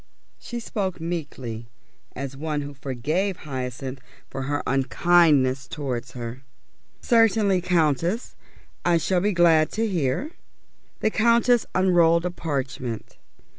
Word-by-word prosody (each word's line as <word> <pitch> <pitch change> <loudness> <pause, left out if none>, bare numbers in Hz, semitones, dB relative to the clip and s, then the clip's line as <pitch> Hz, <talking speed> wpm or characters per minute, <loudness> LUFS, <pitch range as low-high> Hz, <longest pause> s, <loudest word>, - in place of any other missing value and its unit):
She 240 - -6
spoke 195 -5 -3
meekly, 140 -9 -5 0.5
and 135 - -4
as 135 0 -8
one 150 +1 -2
who 145 0 -7
forgave 150 +9 -2
Hyacinth 130 -2 -5 0.3
for 135 - -4
her 145 0 -1
unkindness 135 -1 +3
towards 125 -3 -4
her. 120 +1 -6 0.6
"Certainly, 220 -5 +3
Countess. 170 - 0 0.5
I 175 -1 +3
shall 180 +2 +1
be 205 +2 +2
glad 165 -4 +4
to 225 +1 0
hear." 175 - -1 0.7
The 220 - +2
Countess 235 +2 +3
unrolled 175 -2 +4
a 180 - -1
parchment. 130 -8 -4
160 Hz, 120 wpm, -24 LUFS, 135-185 Hz, 0.7 s, glad